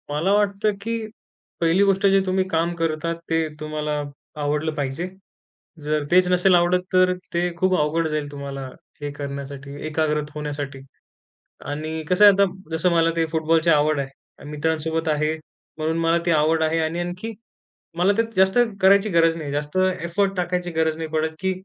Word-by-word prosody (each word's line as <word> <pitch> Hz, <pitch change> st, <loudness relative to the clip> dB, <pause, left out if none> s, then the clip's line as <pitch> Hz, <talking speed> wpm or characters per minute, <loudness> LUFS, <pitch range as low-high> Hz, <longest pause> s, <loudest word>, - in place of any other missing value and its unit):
मला 150 Hz, +6 st, 0 dB
वाटतं 205 Hz, 0 st, +1 dB
की 230 Hz, +2 st, -2 dB, 0.6 s
1ली 170 Hz, +4 st, +4 dB
गोष्ट 195 Hz, 0 st, +2 dB
जे 195 Hz, -, +5 dB
तुम्ही 185 Hz, 0 st, +1 dB
काम 165 Hz, 0 st, 0 dB
करतात 165 Hz, 0 st, -1 dB
ते 165 Hz, 0 st, +1 dB
तुम्हाला 150 Hz, -1 st, -3 dB, 0.4 s
आवडलं 150 Hz, +2 st, -1 dB
पाहिजे. 145 Hz, +4 st, -3 dB, 0.8 s
जर 150 Hz, 0 st, 0 dB
तेच 180 Hz, 0 st, +5 dB
नसेल 180 Hz, +1 st, +4 dB
आवडत 175 Hz, +1 st, +3 dB
तर 185 Hz, 0 st, +4 dB, 0.2 s
ते 175 Hz, +1 st, 0 dB
खूप 185 Hz, +2 st, +2 dB
अवघड 155 Hz, +2 st, +1 dB
जाईल 150 Hz, -1 st, -2 dB
तुम्हाला 140 Hz, -1 st, -6 dB, 0.3 s
हे 145 Hz, 0 st, -3 dB
करण्यासाठी, 140 Hz, 0 st, -7 dB
एकाग्रत 150 Hz, -1 st, -1 dB
होण्यासाठी. 145 Hz, -2 st, -5 dB, 0.9 s
आणि 155 Hz, +2 st, -4 dB
कसं 180 Hz, +3 st, +5 dB
आहे 205 Hz, -, +9 dB
आता 200 Hz, +1 st, +4 dB, 0.3 s
जसं 180 Hz, +3 st, +2 dB
मला 165 Hz, -1 st, +3 dB
ते 165 Hz, -, +2 dB
फुटबॉलची 160 Hz, +1 st, +2 dB
आवड 150 Hz, -1 st, +3 dB
आहे. 135 Hz, -1 st, -4 dB, 0.4 s
मित्रांसोबत 160 Hz, +1 st, -1 dB
आहे 155 Hz, +1 st, +1 dB, 0.4 s
म्हणून 160 Hz, +1 st, -1 dB
मला 165 Hz, 0 st, +2 dB
ते -, -, +3 dB
आवड 160 Hz, +1 st, +2 dB
आहे 160 Hz, +1 st, +1 dB
आणि 160 Hz, +1 st, -1 dB
आणखी 180 Hz, +6 st, -4 dB, 0.7 s
मला 185 Hz, +3 st, +4 dB
ते -, -, +5 dB
जास्त 190 Hz, +4 st, +4 dB, 0.2 s
करायची 200 Hz, +2 st, +5 dB
गरज 165 Hz, -2 st, +3 dB
नाही. 150 Hz, -4 st, -5 dB
जास्त 145 Hz, +3 st, -3 dB, 0.2 s
एफोर्ट 195 Hz, +4 st, 0 dB
टाकायची 180 Hz, 0 st, -1 dB
गरज 160 Hz, -1 st, 0 dB
नाही 160 Hz, -1 st, -4 dB
पडत 160 Hz, 0 st, -1 dB
की 190 Hz, +1 st, 0 dB
160 Hz, 165 wpm, -23 LUFS, 150-180 Hz, 0.9 s, आहे